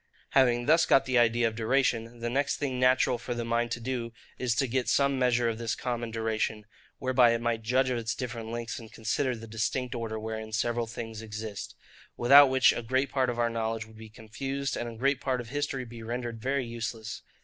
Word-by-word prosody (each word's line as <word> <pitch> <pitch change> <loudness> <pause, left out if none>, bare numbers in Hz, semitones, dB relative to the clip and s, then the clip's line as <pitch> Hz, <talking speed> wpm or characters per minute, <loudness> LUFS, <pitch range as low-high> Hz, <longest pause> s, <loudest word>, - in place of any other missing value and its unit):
Having 120 -2 +3
thus 160 +4 +4
got 135 - +5
the 130 -2 +3
idea 120 0 +3
of 115 - -3
duration, 115 0 0
the 120 - -1
next 140 +2 0
thing 130 -3 -2
natural 125 -1 +3
for 120 +1 -4
the 120 -1 -3
mind 120 0 0
to 120 - -3
do, 120 -1 -4 0.3
is 125 -3 0
to 135 - +2
get 125 -2 -1
some 140 0 +2
measure 125 -2 +2
of 115 -1 -2
this 115 -1 -1
common 120 -2 -3
duration, 110 -1 -2 0.3
whereby 130 -3 +4
it - - -2
might 120 -1 0
judge 130 +3 +1
of 120 - 0
its 115 -1 -2
different 115 -3 -5
lengths, 115 0 -4
and 110 -2 -12
consider 125 +3 -1
the 115 0 -9
distinct 115 +3 -2
order 115 -2 -4
wherein 110 0 -5
several 120 +1 0
things 115 -1 -6
exist; 110 -2 -6 0.4
without 140 +3 +8
which 130 0 +5
a - - -3
great 130 +3 0
part 130 -2 +1
of 120 - -3
our 120 -1 +1
knowledge 115 -1 -2
would 110 0 -17
be 110 0 -10
confused, 135 +6 -4
and 120 - -3
a 115 - -10
great 135 +2 +1
part 130 -3 0
of 120 -2 -7
history 145 -2 -2
be 115 -1 -10
rendered 120 0 -4
very 135 +1 0
useless. 115 -1 -5
120 Hz, 215 wpm, -29 LUFS, 115-130 Hz, 0.4 s, without